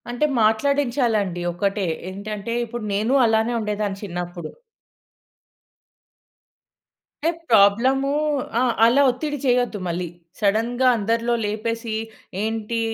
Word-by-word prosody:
అంటే 245 Hz, +5 st, 0 dB, 0.2 s
మాట్లాడించాలండి. 225 Hz, -5 st, +1 dB
ఒకటే 200 Hz, +2 st, -1 dB, 0.3 s
ఏంటంటే, 210 Hz, +3 st, -5 dB
ఇప్పుడు 235 Hz, 0 st, -6 dB
నేను 215 Hz, +6 st, +1 dB
అలానే 225 Hz, +1 st, +2 dB
ఉండేదాన్ని 210 Hz, -2 st, -2 dB
చిన్నప్పుడు. 175 Hz, -3 st, -5 dB, 2.7 s
అంటే 330 Hz, -, +4 dB, 0.2 s
ప్రాబ్లమూ 235 Hz, +6 st, +4 dB, 0.5 s
ఆ! -, -, +2 dB, 0.2 s
అలా 245 Hz, +5 st, +5 dB
ఒత్తిడి 290 Hz, +4 st, -2 dB
చేయొద్దు 245 Hz, -4 st, +1 dB
మళ్ళీ. 175 Hz, +1 st, -2 dB, 0.3 s
సడెన్‌గా 230 Hz, +5 st, +1 dB
అందరిలో 230 Hz, +3 st, 0 dB
లేపేసి, 225 Hz, +2 st, -3 dB, 0.5 s
ఏంటి 225 Hz, +1 st, -2 dB
220 Hz, 95 wpm, -22 LUFS, 205-240 Hz, 2.7 s, అలా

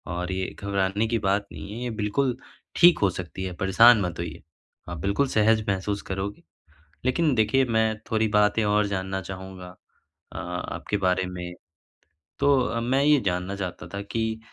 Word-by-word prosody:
और 90 Hz, +1 st, -3 dB
ये 95 Hz, 0 st, -3 dB
घबराने 100 Hz, +1 st, 0 dB
की 115 Hz, 0 st, 0 dB
बात 100 Hz, 0 st, 0 dB
नहीं 100 Hz, -, -8 dB
है 115 Hz, -, -6 dB
ये 125 Hz, -, -2 dB
बिल्कुल 125 Hz, +4 st, 0 dB, 0.4 s
ठीक 175 Hz, 0 st, +6 dB
हो 100 Hz, -, +3 dB
सकती 90 Hz, +1 st, -6 dB
है 90 Hz, -1 st, -4 dB
परेशान 110 Hz, +4 st, +6 dB
मत 90 Hz, -3 st, -3 dB
होइए। 85 Hz, -3 st, -5 dB, 0.5 s
आप 85 Hz, -, -5 dB
बिल्कुल 100 Hz, -, 0 dB
सहज 110 Hz, -1 st, +3 dB
महसूस 100 Hz, +1 st, -1 dB
करोगे। 95 Hz, +2 st, -4 dB, 0.6 s
लेकिन 140 Hz, +2 st, +2 dB
देखिए 110 Hz, +4 st, +3 dB
मैं 110 Hz, -2 st, +1 dB
थोड़ी 110 Hz, 0 st, +2 dB
बातें 105 Hz, +1 st, +3 dB
और 105 Hz, 0 st, +2 dB
जानना 95 Hz, -1 st, -3 dB
चाहूँगा 95 Hz, 0 st, -8 dB, 0.6 s
अ, -, -, -8 dB
आपके 90 Hz, +3 st, -4 dB
बारे 90 Hz, 0 st, +1 dB
में। 90 Hz, -1 st, -6 dB, 0.9 s
तो 130 Hz, -5 st, +2 dB
मैं 130 Hz, +4 st, +1 dB
ये 150 Hz, 0 st, +5 dB
जानना 90 Hz, +1 st, -1 dB
चाहता 95 Hz, -3 st, -5 dB
था 100 Hz, -, -3 dB
कि 110 Hz, +2 st, -3 dB
100 Hz, 165 wpm, -25 LUFS, 95-115 Hz, 0.9 s, ठीक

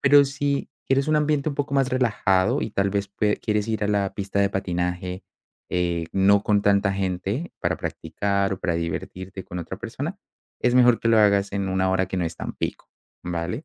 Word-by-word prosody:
Pero 140 Hz, +1 st, +7 dB
si 140 Hz, 0 st, -1 dB, 0.2 s
quieres 135 Hz, +2 st, +2 dB
un 155 Hz, -, +3 dB
ambiente 150 Hz, 0 st, +1 dB
un 145 Hz, -, -3 dB
poco 140 Hz, -1 st, -2 dB
más 135 Hz, -2 st, +3 dB
relajado 105 Hz, -7 st, +2 dB
y -, -, -3 dB
tal 100 Hz, 0 st, 0 dB
vez 100 Hz, 0 st, -1 dB
pue 105 Hz, +1 st, 0 dB
quieres 105 Hz, -1 st, -1 dB
ir 110 Hz, -1 st, -1 dB
a -, -, 0 dB
la 100 Hz, -2 st, +1 dB
pista 100 Hz, 0 st, -1 dB
de 100 Hz, -, +3 dB
patinaje, 90 Hz, -1 st, -2 dB, 0.4 s
eh, 85 Hz, -2 st, -1 dB
no 100 Hz, +1 st, +4 dB
con 105 Hz, -1 st, +2 dB
tanta 100 Hz, -1 st, +3 dB
gente 95 Hz, -, -2 dB
para -, -, 0 dB
practicar 100 Hz, -1 st, -1 dB
o 95 Hz, -, -5 dB
para 85 Hz, -, 0 dB
divertirte 90 Hz, +3 st, -5 dB
con 90 Hz, -, -6 dB
otra 85 Hz, +3 st, -6 dB
persona, 140 Hz, -, -5 dB, 0.4 s
es 125 Hz, 0 st, +2 dB
mejor 125 Hz, -2 st, +6 dB
que 115 Hz, -, 0 dB
lo 115 Hz, -, +5 dB
hagas 100 Hz, -1 st, +4 dB
en 100 Hz, -1 st, -1 dB
una 95 Hz, 0 st, +1 dB
hora 95 Hz, 0 st, +1 dB
que 95 Hz, -, -4 dB
no 90 Hz, -, 0 dB
es 80 Hz, 0 st, -4 dB
tan -, -, -5 dB
pico, -, -, -5 dB, 0.3 s
¿vale? 90 Hz, -, -3 dB
100 Hz, 205 wpm, -24 LUFS, 95-120 Hz, 0.4 s, Pero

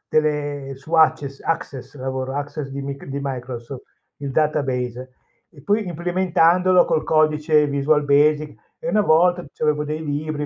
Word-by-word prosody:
delle 145 Hz, -2 st, -1 dB
su 140 Hz, +5 st, -14 dB
Abces 145 Hz, -4 st, +2 dB
Access, 145 Hz, -4 st, -4 dB
lavoro 130 Hz, 0 st, -4 dB
su 140 Hz, -, -2 dB
Access 145 Hz, 0 st, -5 dB
di 140 Hz, 0 st, -6 dB
mic 140 Hz, 0 st, -6 dB
di 140 Hz, +1 st, -4 dB
Microsoft, 125 Hz, -1 st, -6 dB, 0.3 s
il 140 Hz, -1 st, -5 dB
database. 130 Hz, -4 st, -1 dB, 0.4 s
E 145 Hz, -6 st, -17 dB
poi 210 Hz, 0 st, 0 dB
implementandolo 180 Hz, +1 st, +3 dB
col 155 Hz, -, 0 dB
codice 155 Hz, -1 st, +3 dB
Visual 145 Hz, +1 st, +1 dB
Basic. 150 Hz, +1 st, +3 dB, 0.3 s
E -, -, -2 dB
una 215 Hz, -4 st, +2 dB
volta 175 Hz, 0 st, +3 dB
c'avevo 150 Hz, -1 st, 0 dB
dei 155 Hz, +1 st, -4 dB
libri, 150 Hz, 0 st, -3 dB
150 Hz, 150 wpm, -21 LUFS, 140-155 Hz, 0.4 s, implementandolo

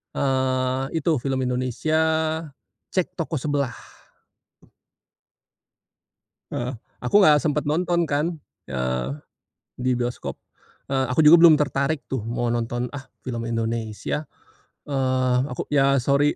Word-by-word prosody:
eee, 130 Hz, -1 st, +1 dB
itu 160 Hz, +1 st, +1 dB
film 135 Hz, +1 st, -1 dB
Indonesia, 130 Hz, +5 st, 0 dB, 0.9 s
Cek 185 Hz, -1 st, -1 dB
Toko 160 Hz, -3 st, -2 dB
Sebelah. 140 Hz, -4 st, -1 dB, 2.8 s
Heeh, 125 Hz, +2 st, -3 dB, 0.3 s
aku 125 Hz, -, -2 dB
gak 150 Hz, -1 st, +6 dB
sempet 150 Hz, -1 st, 0 dB
nonton 170 Hz, +3 st, +1 dB
kan, 155 Hz, +3 st, 0 dB, 0.3 s
eee, 65 Hz, -2 st, -2 dB, 0.7 s
di 125 Hz, 0 st, +1 dB
bioskop, 120 Hz, 0 st, -3 dB, 0.5 s
eee, 135 Hz, -1 st, +1 dB
aku 125 Hz, +5 st, +1 dB
juga 165 Hz, +3 st, +9 dB
belum 165 Hz, -2 st, +9 dB
tertarik 140 Hz, +1 st, 0 dB
tuh 130 Hz, -3 st, -1 dB
mau 120 Hz, 0 st, -1 dB
nonton 120 Hz, +1 st, -2 dB
ah 135 Hz, -2 st, -8 dB, 0.2 s
film 115 Hz, -2 st, -4 dB
Indonesia, 115 Hz, +5 st, -2 dB, 0.6 s
eee, 130 Hz, -2 st, +1 dB, 0.2 s
aku 125 Hz, -, -5 dB
ya 140 Hz, -1 st, +3 dB
sorry, 140 Hz, +3 st, +3 dB
130 Hz, 115 wpm, -24 LUFS, 125-150 Hz, 2.8 s, juga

